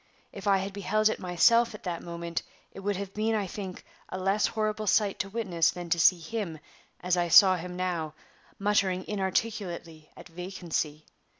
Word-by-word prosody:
If 200 Hz, +1 st, -8 dB
I 195 Hz, -1 st, +5 dB
had 195 Hz, +1 st, -4 dB
beheld 210 Hz, +2 st, +1 dB
it -, -, -3 dB
myself 230 Hz, +6 st, +3 dB
at -, -, -12 dB
that 175 Hz, -3 st, -3 dB
moment, 170 Hz, -1 st, -4 dB, 0.3 s
it -, -, -10 dB
would 200 Hz, +1 st, -1 dB
have 195 Hz, 0 st, -5 dB
been, 220 Hz, +1 st, 0 dB
I 210 Hz, -2 st, 0 dB
think, 190 Hz, -1 st, -7 dB, 0.2 s
a -, -, -4 dB
less 195 Hz, +3 st, +2 dB
horrible 215 Hz, -1 st, -2 dB
sight 205 Hz, 0 st, +2 dB
to 195 Hz, -, -2 dB
witness 190 Hz, -7 st, +1 dB
than 175 Hz, -1 st, -6 dB
to 170 Hz, -, +3 dB
see 180 Hz, +3 st, +6 dB
him, 170 Hz, -1 st, -4 dB, 0.4 s
as 180 Hz, 0 st, +1 dB
I 175 Hz, 0 st, +1 dB
saw 185 Hz, +2 st, +8 dB
him 180 Hz, 0 st, -6 dB
now, 170 Hz, -4 st, -2 dB, 0.4 s
muttering 195 Hz, -2 st, +1 dB
inarticulately 190 Hz, -5 st, -3 dB
at -, -, -11 dB
vacancy. 165 Hz, -3 st, -4 dB
190 Hz, 180 wpm, -28 LUFS, 175-205 Hz, 0.4 s, saw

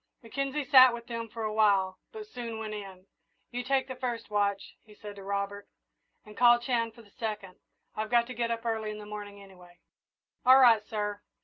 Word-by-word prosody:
Mackenzie 275 Hz, +4 st, -3 dB
sat 255 Hz, -3 st, +7 dB
with 235 Hz, 0 st, -10 dB
them 230 Hz, -1 st, -5 dB
for 225 Hz, +1 st, -6 dB
a 215 Hz, 0 st, -2 dB
while, 200 Hz, -3 st, +2 dB
but 435 Hz, -1 st, -8 dB
soon 240 Hz, -, -7 dB
went 220 Hz, -1 st, -5 dB
in. 195 Hz, -3 st, -9 dB, 0.5 s
"You 245 Hz, 0 st, -3 dB
take 265 Hz, +1 st, 0 dB
the 260 Hz, -, -6 dB
first 245 Hz, -4 st, -4 dB
watch," 200 Hz, -1 st, -1 dB
he 210 Hz, -1 st, -18 dB
said 205 Hz, -1 st, -10 dB
to 195 Hz, -, -9 dB
Robert, 200 Hz, +1 st, -4 dB, 0.6 s
"and 210 Hz, 0 st, -13 dB
call 240 Hz, +1 st, +6 dB
Chan 235 Hz, -2 st, -1 dB
for 235 Hz, -, -15 dB
the 205 Hz, -, -22 dB
second. 210 Hz, -5 st, -5 dB, 0.4 s
I've 215 Hz, 0 st, -3 dB
got 235 Hz, -1 st, +3 dB
to 250 Hz, -, -8 dB
get 235 Hz, -1 st, -2 dB
up 230 Hz, 0 st, -3 dB
early 220 Hz, -2 st, -1 dB
in 210 Hz, -, -6 dB
the 210 Hz, -, -9 dB
morning, 205 Hz, -1 st, -8 dB
anyway." 180 Hz, -2 st, -17 dB, 0.7 s
"All 260 Hz, +1 st, +8 dB
right, 230 Hz, -5 st, +6 dB
sir." 210 Hz, -1 st, -4 dB
220 Hz, 205 wpm, -29 LUFS, 205-240 Hz, 0.7 s, All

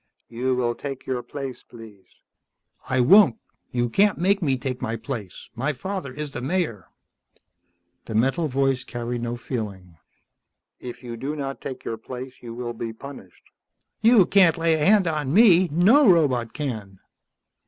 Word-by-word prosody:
"You 125 Hz, +2 st, -1 dB
will 120 Hz, -1 st, 0 dB
take 135 Hz, +1 st, -7 dB
your 125 Hz, -2 st, -2 dB
place, 135 Hz, -1 st, -7 dB
please." 110 Hz, -5 st, -14 dB, 0.8 s
"I 130 Hz, -1 st, +2 dB
won't. 170 Hz, -, +6 dB, 0.3 s
You 120 Hz, -1 st, 0 dB
can't 200 Hz, -, +2 dB
make 195 Hz, +3 st, +1 dB
me 135 Hz, -6 st, +1 dB
take 125 Hz, 0 st, -4 dB
my 115 Hz, -, -2 dB
place. 110 Hz, -5 st, -7 dB
My 135 Hz, +6 st, -2 dB
father 185 Hz, 0 st, -5 dB
is 150 Hz, +2 st, -6 dB
the 120 Hz, -, -6 dB
Mayor." 135 Hz, -, -2 dB, 1.2 s
The 110 Hz, -, -6 dB
metal 135 Hz, +8 st, +1 dB
voice 135 Hz, -1 st, 0 dB
carried 120 Hz, 0 st, -5 dB
no 120 Hz, 0 st, -3 dB
feeling. 100 Hz, -9 st, -6 dB, 0.8 s
"If 125 Hz, 0 st, -9 dB
you 120 Hz, -1 st, -7 dB
do 140 Hz, +6 st, -4 dB
not 135 Hz, -2 st, -5 dB
take 130 Hz, -, -7 dB
your 115 Hz, -, -3 dB
place 125 Hz, +3 st, -8 dB
you 115 Hz, -1 st, -8 dB
will 120 Hz, -1 st, -5 dB
be 115 Hz, 0 st, -5 dB
punished." 110 Hz, -7 st, -12 dB, 0.6 s
"You 225 Hz, -3 st, +6 dB
can't 185 Hz, -4 st, +4 dB
lay 165 Hz, 0 st, +2 dB
a 155 Hz, -1 st, 0 dB
hand 200 Hz, +1 st, +5 dB
on 150 Hz, -5 st, -1 dB
me. 185 Hz, -2 st, +6 dB
No 205 Hz, -, +5 dB
robot 130 Hz, -9 st, +2 dB
can." 110 Hz, -10 st, -5 dB
130 Hz, 160 wpm, -24 LUFS, 120-160 Hz, 1.2 s, won't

